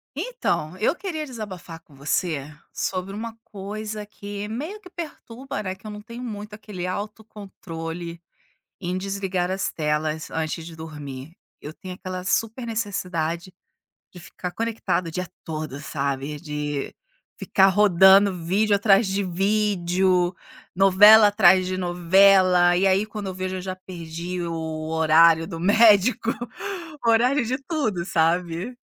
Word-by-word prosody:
Então, 320 - -2
eu 215 - +2
queria 335 -4 -5
desabafar 200 - -8
com 145 - -21
você 145 +1 -2 0.2
sobre 190 +1 -3
uma 225 +2 -5
coisa 210 +1 -6
que 205 0 -7
meio 310 - -5
que 365 - -13
perturba, 275 -8 -7
né, 185 - -3
que 190 +3 -13
eu - - -6
não 210 0 -8
tenho 235 +3 -9
muito 210 -3 -7
aquele 205 -4 -7
autocontrole 180 -5 -7 0.6
em 180 -1 -3
desligar 190 -2 -2
as 195 +1 -2
telas 155 0 -2
antes 160 0 -3
de 165 0 -10
dormir. 150 -3 -8 0.3
Eu 150 - -8
tenho 185 +3 -9
aquela 185 -1 -6
super 225 +5 -1
necessidade, 185 -6 -3 0.6
de 180 - -12
ficar 180 +1 -7
conectada 225 -5 -2
o - - -9
dia 180 +2 -4 0.2
todo, 155 -3 -5
sabe, 140 0 -3
de 150 -3 -4 0.4
ficar 190 - +3
rodando 195 0 +6
vídeo 200 +5 +2
atrás 200 +1 +4
de 195 +1 -1
vídeo, 185 -2 +1 0.4
novela 205 +3 +8
atrás 190 -3 +5
de 185 0 -2
novela 180 0 +4
e 190 +2 +3
aí 190 +2 +3
quando 210 -2 -6
eu 190 - -4
vejo 185 0 -3
eu - - -5
já 185 0 -5
perdi 175 -1 -6
o 160 -2 -4
horário 160 +1 +5
do 165 -3 -6
médico, 215 +4 +4 0.7
horário 240 +4 +3
de 250 +3 -1
tudo, 225 - -1
sabe. 170 +5 0
185 Hz, 140 wpm, -24 LUFS, 170-210 Hz, 0.7 s, novela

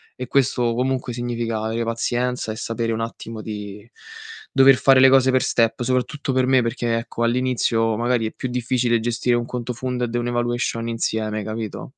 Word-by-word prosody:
e 125 0 -6
questo 125 -3 +1
comunque 130 0 -1
significa 120 -2 -3
avere 110 +1 -2
pazienza 120 +1 -1
e - - -5
sapere 115 0 -2
un 110 - -2
attimo 115 -1 -6
di 105 0 -8 0.6
dover 135 0 +6
fare 135 +1 +5
le 135 - +8
cose 130 0 +5
per 130 - +3
step, 115 +1 +1
soprattutto 130 +3 -1
per 130 0 +2
me 130 -1 +4
perché, 115 0 -1
ecco, 115 0 -4
all'inizio 115 -2 +1
magari 120 -1 +1
è - - -7
più 130 - -5
difficile 120 -1 0
gestire 120 +2 0
un 120 - -2
conto 125 0 -4
funded 125 -1 -3
e 120 - 0
un 120 - -2
evaluation 120 -1 -1
insieme, 110 -2 -2
capito? 110 -1 -5
120 Hz, 180 wpm, -22 LUFS, 115-125 Hz, 0.6 s, le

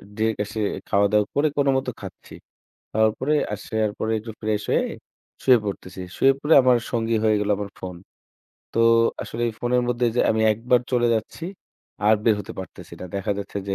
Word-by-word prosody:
Direct 110 -1 0
আসে 110 +2 -6 0.3
খাওয়া-দাওয়া 100 +1 +3
করে 145 +2 +3
কোনো 140 -1 +3
মতে 130 - -2
খাচ্ছি। - - -10 0.6
খাওয়ার 110 0 +3
পরে 140 +4 +1 0.2
আসার 110 +1 -1
পরে 110 - -1
একটু 110 +1 -8
ফ্রেশ 105 -1 -1
হয়ে - - +2 0.6
শুয়ে 130 -2 +6
পড়তেছি। 95 -2 -6 0.2
শুয়ে 135 - +5
পড়ে 150 +3 +3
আমার 125 -1 +4
সঙ্গী 115 -1 0
হয়ে 110 -1 +4
গেলো 105 0 0
আমার 100 - -4
ফোন। 90 -1 -6 0.8
তো, 115 - +2 0.4
আসলে 115 - -5
এই - - -4
ফোন 120 - -2
এর 125 - +3
মধ্যে 120 0 +1
যে, - - +4
আমি 110 0 +1
একবার 120 +3 +2
চলে 120 -1 +3
যাচ্ছি, 110 +8 -4 0.6
আর 110 - +7
বের 110 -2 +5
হতে 100 - -8
পারতেছি 95 - -9
না। - - -5
দেখা 100 +1 -1
যাচ্ছে 100 0 -5
যে, 95 - 0
110 Hz, 190 wpm, -23 LUFS, 105-120 Hz, 0.8 s, আর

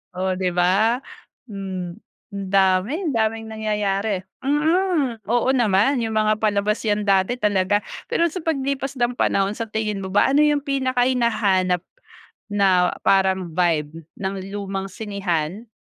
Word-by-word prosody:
Oh, 185 0 -1
'di 185 -1 0
ba? 200 +7 +3 0.5
Hmm, 190 -3 -6 0.4
ang 200 -1 -4
dami 195 - +2
daming 225 -1 -1
nangyayari. 210 -2 -1 0.2
Mm, 295 - +1
oo 240 +4 +1
naman, 235 +3 +3
yung 225 - -2
mga 215 0 +3
palabas 210 +1 +1
yan 210 -1 0
dati 195 +5 +2
talaga. 205 -1 +2 0.3
Pero 340 - +3
sa 340 0 -6
paglipas 275 -3 -2
ng 240 0 +1
panahon 195 -2 +1
sa 230 - -3
tingin 210 -3 -2
mo 190 - -5
ba 205 - +4
ano 300 - +5
yung 295 -1 +3
pinaka 260 -3 +1
hinahanap 200 -8 +1 0.7
na 185 -3 +3
parang 190 -3 +2
vibe 165 -2 0 0.2
ng 195 0 -2 0.2
lumang 195 -1 -4
sinehan, 200 -1 -3
210 Hz, 135 wpm, -22 LUFS, 190-245 Hz, 0.7 s, ano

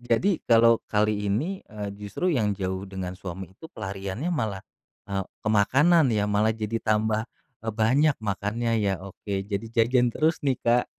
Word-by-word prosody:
Jadi 120 - +1
kalau 115 0 +6
kali 105 -1 +1
ini, 160 - -1
eee, 105 -2 -6
justru 105 - -2
yang 105 -6 +1
jauh 95 0 -3
dengan 95 -1 -5
suami 95 0 -7
itu 100 - -12
pelariannya 100 - -4
malah, 110 - -2 0.4
e 100 - -10 0.3
ke 110 - -1
makanan 140 - +4
ya, 105 -3 +1
malah 105 +2 +2
jadi 110 +1 -2
tambah 110 +1 +1 0.3
banyak 115 +7 +2
makannya 110 +3 -1
ya. 100 -2 +1
Oke 100 0 -4
jadi 100 +2 -3
jajan 120 +2 +3
terus 160 +1 +1
nih, 130 -3 +2
Kak. 120 +1 +3
110 Hz, 160 wpm, -26 LUFS, 100-120 Hz, 0.4 s, kalau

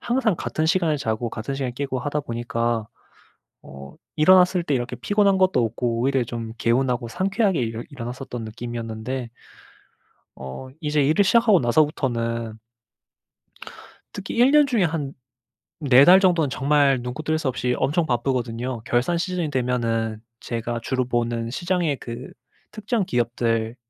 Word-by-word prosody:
항상 240 -5 +1
같은 155 - -2
시간에 165 -3 +2
자고 115 -3 -2
같은 120 +5 -5
시간에 130 -2 -3
깨고 130 0 -3
하다 145 +3 -2
보니까 115 -2 -2 0.8
어 70 0 -11 0.2
일어났을 180 +2 +5
때 145 -4 -1
이렇게 125 0 -3
피곤한 200 - +2
것도 185 -10 +3
없고 115 +1 -2
오히려 135 0 +1
좀 115 -1 -6
개운하고 120 0 +1
상쾌하게 195 - 0
일어 115 0 -3
일어났었던 125 -2 -6
느낌이었는데 115 +2 -5 1.1
어 65 - -8
이제 150 -1 +1
일을 160 +9 +3
시작하고 220 -2 +5
나서부터는 115 -4 0 1.6
특히 200 +2 -6
1 250 +4 +5
년 295 -1 +5
중에 230 -7 +1
한 155 -4 -2 0.7
4 135 -2 +6
달 185 +2 +8
정도는 175 -7 +2
정말 140 -1 +2
눈코 125 +5 -5
뜰 155 +1 -1
새 155 - -3
없이 125 -1 -1
엄청 155 +5 +1
바쁘거든요. 120 -1 -2
결산 125 +8 +1
시즌이 180 -4 -2
되면은 115 -4 -1 0.2
제가 115 0 -4
주로 130 +1 -1
보는 120 -1 -2
시장의 175 -3 -1
그 120 +1 -8 0.4
특정 215 -1 -2
기업들 115 -2 -1
130 Hz, 310 characters per minute, -23 LUFS, 115-160 Hz, 1.6 s, 달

